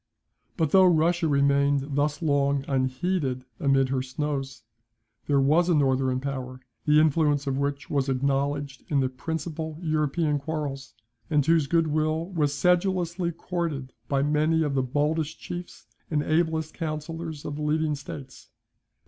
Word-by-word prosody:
But 160 -5 +1
though 190 -1 +7
Russia 170 0 +3
remained 140 0 +2
thus 145 +3 0
long 140 -2 +1
unheeded 130 0 -1
amid 135 -1 +3
her 130 -1 0
snows, 135 0 -4 0.6
there 140 -1 +3
was 155 +6 +3
a 175 - +4
northern 130 -2 +2
power, 130 -2 -5 0.3
the 150 0 +5
influence 150 -2 +2
of 135 -1 -1
which 140 0 -2
was 140 -2 0
acknowledged 140 +1 -1
in 145 - +2
the 130 -1 +1
principal 160 +3 -5
European 155 -2 0
quarrels, 140 -3 -5 0.3
and 150 -4 +2
whose 160 -2 +3
good 165 +2 +3
will 155 +3 -1
was 150 -5 +1
sedulously 180 +1 +1
courted 165 -6 -4
by 140 -1 +1
many 155 +2 +2
of 145 -2 -1
the 135 - +2
boldest 150 +4 -1
chiefs 175 -7 -8 0.2
and 150 -2 0
ablest 160 0 0
councillors 160 -1 -5
of 145 - -4
the - - -5
leading 155 +1 +1
states. 140 -1 -9
150 Hz, 145 wpm, -26 LUFS, 140-160 Hz, 0.6 s, though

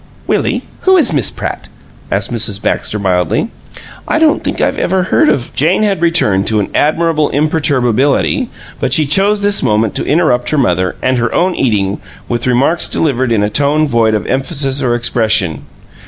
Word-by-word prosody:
"Willie, - - -1 0.2
who 380 0 +3
is 285 - +2
Miss 135 -9 +1
Pratt?" - - -6 0.4
asked - - -1
Mrs. 105 -3 0
Baxter, 105 - -2
mildly. 95 - -1 0.6
"I - - 0
don't 315 -1 +2
think - - -3
I've - - 0
ever 190 -1 0
heard 305 - +2
of 120 - -1
" - - -24
Jane 170 +9 +2
had 200 -5 0
returned 105 - +1
to 110 -1 +1
an 100 - -2
admirable 155 0 +1
imperturbability, 145 - 0 0.3
but 130 -2 -1
she 155 +2 +3
chose 200 +8 +2
this 205 0 +2
moment 110 -4 +1
to - - -2
interrupt 145 -6 +1
her 155 - 0
mother, 90 -8 0
and 130 -1 +1
her 120 -1 -1
own 180 +1 +1
eating, 105 - -1 0.3
with 120 0 -2
remarks 135 +7 +2
delivered 130 -5 -1
in 105 -3 +2
a 105 - 0
tone 145 +6 +1
void 115 -4 +1
of 105 - -3
emphasis 135 0 0
or 120 -2 +1
expression. 110 - 0
135 Hz, 180 wpm, -13 LUFS, 110-165 Hz, 0.6 s, who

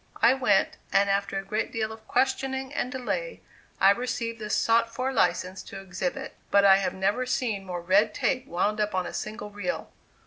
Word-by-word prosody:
I 235 +2 +6
went, 245 -7 +2
and 200 0 +3
after 200 0 0
a 195 - -4
great 215 +3 -2
deal 220 -1 -2
of 220 0 -12
questioning 265 +1 0
and 255 - -2
delay, 480 - -3 0.4
I 195 - +7
received 230 0 -2
the 215 -1 -5
sought 230 +1 +2
for 255 +3 -2
license 185 -6 +1
to 195 - -8
exhibit; 185 -1 -4 0.2
but 200 0 +5
I 195 -1 +8
have 195 - -1
never 200 +7 0
seen 220 -7 -1
more 175 -1 -4
red 200 +5 +4
tape 255 -2 0
wound 205 +5 0
up 210 -2 -1
on 185 -1 0
a - - -6
single 215 -1 -5
reel. 205 +7 -4
215 Hz, 195 wpm, -27 LUFS, 195-250 Hz, 0.4 s, I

